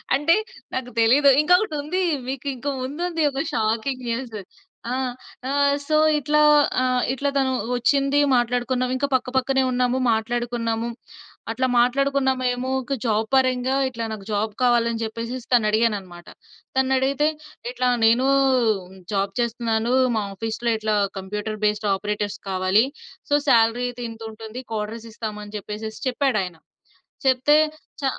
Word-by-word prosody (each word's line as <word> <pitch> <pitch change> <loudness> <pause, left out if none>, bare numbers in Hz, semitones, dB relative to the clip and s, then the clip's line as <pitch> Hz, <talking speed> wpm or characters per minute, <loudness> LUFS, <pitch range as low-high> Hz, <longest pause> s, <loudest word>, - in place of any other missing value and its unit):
అంటే 295 +6 +3 0.4
నాకు 250 -1 -3
తెలిదు. 265 +6 +5
ఇంకొకటుంది. 355 -1 +1 0.3
మీకు 270 +1 -4
ఇంకా 265 +4 -4
ముందుంది 325 +5 -3
ఒక 270 - -2
షాకింగ్ 230 +3 -1
న్యూస్. 230 -2 -3 0.5
ఆహ్, 255 -1 -1 0.4
ఆహ్, 280 0 +3
సో 310 - +1 0.2
ఇట్లా 300 +1 +2 0.4
ఆహ్, 255 -1 +1
ఇట్లా 280 +2 -1
తను 265 -1 +2 0.3
వచ్చింది, 275 +3 +2 0.2
మాట్లాడుకున్నాం. 245 +1 0
ఇంకా 280 - 0
పక్క 250 -1 -1
పక్కనే 265 +1 +2
ఉన్నాము, 250 0 +1 0.2
మాట్లాడుకున్నాము. 230 0 -2 0.6
అట్లా 260 0 0
మాట్లాడుకున్నామేమో 260 -1 +1
ఒక 275 +2 -3
జాబ్ 220 -1 +1
పరంగా 255 0 +2
ఇట్లా 230 -3 -5
నాకు 210 -3 -7
జాబ్ 210 +1 0
కావాలి 240 -1 +3
అని 230 0 -4
చెప్పేసెసి 230 +2 -5
తన 225 -3 +4
అడిగానన్నమాట. 200 -6 -1 0.5
తనని 265 0 +2
అడిగితే 275 +3 +1 0.4
ఇట్లా 250 0 -1 0.2
నేను 235 +3 +4 0.9
జాబ్ 195 0 0
చేస్తున్నాను 235 0 0 0.2
మా 215 - 0
ఆఫీసులో 225 +3 -2
ఇట్లా 215 -1 0 0.2
కంప్యూటర్ 210 +2 -5
బేస్డ్ 210 0 0
ఆపరేటర్స్ 205 0 -3
కావాలి. 190 +4 +3 0.4
సో 290 - +4
సాలరీ 235 0 +4
ఇది 245 0 -6
ఇంతుంటుంది. 225 +1 -8
క్వార్టర్స్ 220 +2 -4
ఇస్తాము 215 -2 -5
అని 205 - -10
చెప్పేసేసి 215 +2 -7
చెప్పాడాయన. 215 - -1 0.7
చెప్తే 265 +4 +4 0.4
చ - - -4
240 Hz, 130 wpm, -23 LUFS, 220-265 Hz, 0.9 s, తెలిదు